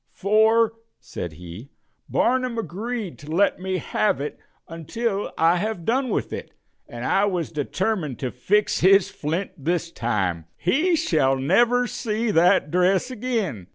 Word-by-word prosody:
"For," 220 +2 +3 0.3
said 85 -3 -7
he, 90 - -10 0.4
"Barnum 255 -1 +1
agreed 220 +1 -4
to 145 - -12
let 190 +5 +2
me 185 0 -2
have 205 -5 0
it 145 +1 -5 0.3
until 200 +6 -3
I 165 +2 +4
have 205 -3 -3
done 255 +3 +1
with - - -2
it, - - -7 0.3
and 120 +1 -6
I 195 - +3
was 175 - -2
determined 155 - -2
to 130 -2 -3
fix 205 +12 +1
his 195 +1 +5
flint 165 +6 -3
this 165 +3 -2
time. 95 - -1
He 310 - +2
shall 155 - +2
never 240 - +3
see 225 -1 -2
that 165 -4 +3
dress 185 +7 +2
again." 215 - -3
185 Hz, 145 wpm, -23 LUFS, 150-225 Hz, 0.4 s, his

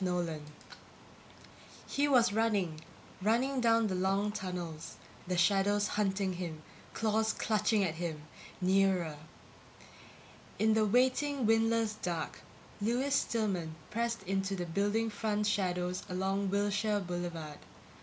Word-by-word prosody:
NOLAN_ 175 -4 -1 1.4
He 285 +1 +1
was 240 -6 +4
running, 200 -8 0 0.4
running 250 +6 +2
down 230 -1 +4
the 200 - -1
long 195 +3 +1
tunnels, 175 -5 -5 0.3
the 180 0 -1
shadows 200 +3 +3
hunting 195 -2 0
him, 170 -3 -6 0.3
claws 220 0 +1
clutching 215 -1 +1
at 170 -4 0
him, 160 -2 -4 0.4
nearer... 185 -4 +2 1.4
In 220 0 +3
the 215 -1 +3
waiting 260 +4 +2
windless 225 0 +3
dark, 170 -3 -3 0.4
Lewis 245 +6 +1
Stillman 195 - 0 0.2
pressed 230 -1 -1
into 195 +1 -1
the 180 -2 -3
building 205 +6 0
front 210 0 -1
shadows 180 -3 0
along 190 +2 -1
Wilshire 205 +1 +1
Boulevard. 175 -4 -5
200 Hz, 115 wpm, -32 LUFS, 180-220 Hz, 1.4 s, was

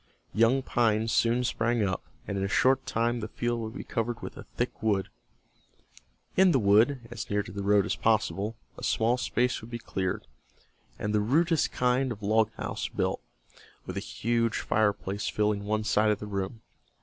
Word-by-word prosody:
Young 115 +5 +3
pines 115 -2 +1
soon 120 +2 +2
sprang 120 -1 +1
up, 95 -2 -1 0.2
and 100 - -3
in 95 - -1
a - - +1
short 130 +6 +3
time 120 +1 0
the 110 - -4
field 120 +2 -2
would 110 0 -5
be - - -5
covered 115 0 -2
with - - -6
a - - -10
thick - - -2
wood. 100 -3 +1 1.3
In 190 -1 +6
the - - +5
wood, 115 +5 +3
as 120 - -6
near 105 0 +1
to 95 - -10
the 100 +2 -5
road 100 0 +3
as - - -1
possible, 110 -1 +1 0.2
a - - -10
small 115 +2 +2
space 125 0 0
would 110 - -10
be 120 - -4
cleared, 95 -5 -3 0.7
and 105 - -2
the 105 - +3
rudest 160 +8 +2
kind 125 +1 +1
of 105 -2 -7
log 110 +1 +3
house - - -3
built, - - -1 0.6
with - - -6
a - - -1
huge 115 -2 0
fireplace 105 -2 0
filling 105 -1 0
one 110 +1 0
side 105 0 +3
of 105 - +2
the - - -7
room. 100 +2 -4
110 Hz, 185 wpm, -28 LUFS, 105-120 Hz, 1.3 s, In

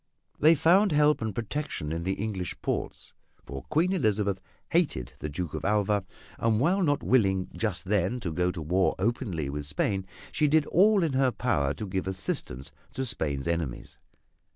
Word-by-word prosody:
They 160 +2 +6
found 180 +6 +4
help 150 -1 +3
and 110 -3 -3
protection 120 - -3
in 85 +1 -2
the 95 +3 -1
English 95 -5 -4
ports, - - -3 0.3
for 70 -1 -7
Queen 175 +5 +2
Elizabeth 105 - 0 0.3
hated 155 - 0
the 75 - -4
Duke 80 +2 -4
of - - -4
Alva, 105 -1 +1 0.3
and 110 -2 +2
while 180 +9 +2
not 145 -5 +1
willing 95 -7 +2
just 105 -6 -2
then 100 +4 0
to 85 -6 -3
go 90 +2 +1
to 85 -3 -6
war 90 +4 +1
openly 95 - -1
with 70 +1 -4
Spain, 95 +6 -1 0.2
she 150 - +2
did 155 0 +3
all 200 +2 +4
in 160 -4 0
her 130 0 +3
power 75 - 0
to 105 - -5
give 95 -1 -3
assistance 70 -8 -2 0.2
to 130 - -2
Spain's 75 - -2
enemies. 85 -7 -3
100 Hz, 175 wpm, -28 LUFS, 85-140 Hz, 0.3 s, They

